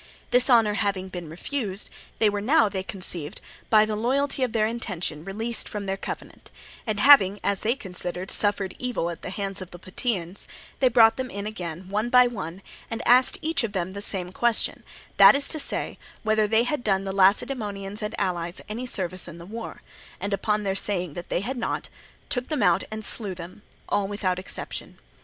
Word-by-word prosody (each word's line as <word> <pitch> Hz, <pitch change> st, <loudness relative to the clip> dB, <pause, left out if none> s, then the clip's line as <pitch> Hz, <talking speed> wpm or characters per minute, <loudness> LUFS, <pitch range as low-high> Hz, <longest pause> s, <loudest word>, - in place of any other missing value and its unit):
This 250 Hz, +2 st, +5 dB
offer 225 Hz, -4 st, +5 dB
having 200 Hz, -2 st, -2 dB
been 175 Hz, -3 st, -7 dB
refused, 200 Hz, -, -3 dB, 0.3 s
they 220 Hz, -, +3 dB
were 205 Hz, 0 st, 0 dB
now, 230 Hz, 0 st, +4 dB
they 195 Hz, -2 st, -3 dB
conceived, 180 Hz, -6 st, -2 dB, 0.3 s
by 215 Hz, -1 st, +6 dB
the 215 Hz, 0 st, -3 dB
loyalty 270 Hz, +5 st, 0 dB
of 255 Hz, -3 st, +1 dB
their 220 Hz, -1 st, +2 dB
intention 185 Hz, -9 st, -3 dB
released 220 Hz, +5 st, -2 dB
from 205 Hz, -1 st, -5 dB
their 195 Hz, 0 st, -1 dB
covenant; 195 Hz, -, -8 dB, 0.4 s
and 215 Hz, -2 st, -1 dB
having, 205 Hz, -6 st, +7 dB
as 200 Hz, -1 st, 0 dB
they 230 Hz, +3 st, +1 dB
considered, 180 Hz, -5 st, -4 dB
suffered 205 Hz, -2 st, +1 dB
evil 240 Hz, -9 st, -2 dB
at 170 Hz, -, -9 dB
the -, -, -6 dB
hands 195 Hz, 0 st, -5 dB
of 185 Hz, -, -7 dB
the 175 Hz, -, -11 dB
Plataeans, 185 Hz, -1 st, -4 dB, 0.3 s
they 265 Hz, -, +4 dB
brought 225 Hz, -2 st, +5 dB
them 260 Hz, -1 st, -3 dB
in 200 Hz, -1 st, -5 dB
again 180 Hz, -4 st, -6 dB
one 210 Hz, +4 st, -1 dB
by 250 Hz, 0 st, +7 dB
one 195 Hz, -6 st, -5 dB, 0.3 s
and 225 Hz, -, -4 dB
asked 250 Hz, +2 st, +6 dB
each 320 Hz, -4 st, 0 dB
of 215 Hz, -3 st, -3 dB
them 185 Hz, -1 st, -2 dB
the 200 Hz, -, -6 dB
same 185 Hz, -3 st, +4 dB
question, 235 Hz, +3 st, +1 dB, 0.4 s
that -, -, +9 dB
is 280 Hz, 0 st, +4 dB
to 310 Hz, -, 0 dB
say, -, -, +3 dB, 0.2 s
whether 215 Hz, -1 st, +2 dB
they 220 Hz, +2 st, +3 dB
had 245 Hz, +1 st, -2 dB
done 195 Hz, -2 st, +1 dB
the 195 Hz, -1 st, -4 dB
Lacedaemonians 200 Hz, 0 st, +1 dB
and 210 Hz, -, -4 dB
allies 175 Hz, -3 st, -1 dB
any 235 Hz, +4 st, -5 dB
service 185 Hz, -5 st, -3 dB
in 170 Hz, -, -9 dB
the 170 Hz, -, -10 dB
war; 225 Hz, +4 st, -8 dB, 0.4 s
and 200 Hz, 0 st, -3 dB
upon 210 Hz, +2 st, 0 dB
their 195 Hz, -1 st, 0 dB
saying 185 Hz, -5 st, -2 dB
that 175 Hz, +2 st, -8 dB
they -, -, 0 dB
had 250 Hz, +6 st, -4 dB
not, 235 Hz, -, -3 dB, 0.4 s
took 245 Hz, -1 st, -2 dB
them 300 Hz, -8 st, -1 dB
out 180 Hz, 0 st, +3 dB
and 215 Hz, -1 st, -3 dB
slew 200 Hz, -5 st, 0 dB
them, 175 Hz, +3 st, -10 dB, 0.3 s
all 200 Hz, -1 st, 0 dB
without 195 Hz, -3 st, -2 dB
exception. 185 Hz, -, -6 dB
205 Hz, 195 wpm, -25 LUFS, 185-230 Hz, 0.4 s, that